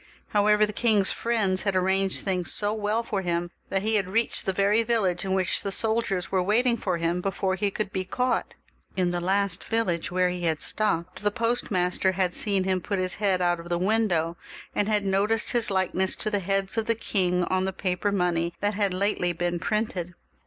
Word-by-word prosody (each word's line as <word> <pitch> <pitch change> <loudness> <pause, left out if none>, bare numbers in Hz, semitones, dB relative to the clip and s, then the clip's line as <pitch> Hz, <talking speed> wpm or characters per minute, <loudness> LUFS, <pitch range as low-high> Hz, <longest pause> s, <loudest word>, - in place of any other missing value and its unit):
However, 210 0 +4
the 210 - -6
king's 210 -4 +3
friends 210 -5 0
had 200 -2 -1
arranged 190 +1 +1
things 185 -3 0
so 205 0 +2
well 215 +1 -1
for 205 -4 -2
him, 175 -1 -2 0.2
that 195 0 -1
he 220 0 +2
had 195 -3 -1
reached 225 +3 0
the - - +3
very 200 +4 +2
village 215 -7 0
in 190 -1 -1
which 185 -2 +1
the 200 - -3
soldiers 220 -4 0
were 190 -1 +2
waiting 235 +6 +2
for 185 -6 -2
him 170 +1 -1
before 190 0 -1
he 200 +2 0
could 200 0 -4
be 190 - -1
caught. 250 +7 -1 0.4
In 180 -2 +1
the 175 0 -2
last 195 0 0
village 190 -7 -1
where 180 0 +1
he 180 -1 -3
had 160 -2 0
stopped, 185 -5 -1
the 205 - +2
post 230 +3 -1
master 185 -1 +1
had 185 -1 0
seen 200 -3 0
him 185 -1 0
put 200 +2 -2
his 185 -1 -2
head 190 -3 +2
out 175 -1 +1
of 170 +1 -10
the 175 - 0
window, 180 -4 +1 0.4
and 205 - 0
had 210 -2 +1
noticed 205 +3 +1
his 240 -2 +2
likeness 190 -1 +1
to 215 - -3
the 205 - +1
heads 195 +3 0
of 220 - -3
the 230 - +2
king 180 -5 0
on 185 +1 0
the 190 - -1
the 190 - -25
paper 185 +2 -1
money 175 -3 0
that 205 +1 0
had 200 -2 0
lately 185 -2 0
been 175 +1 -2
printed. 185 -4 -2
195 Hz, 215 wpm, -26 LUFS, 180-210 Hz, 0.4 s, However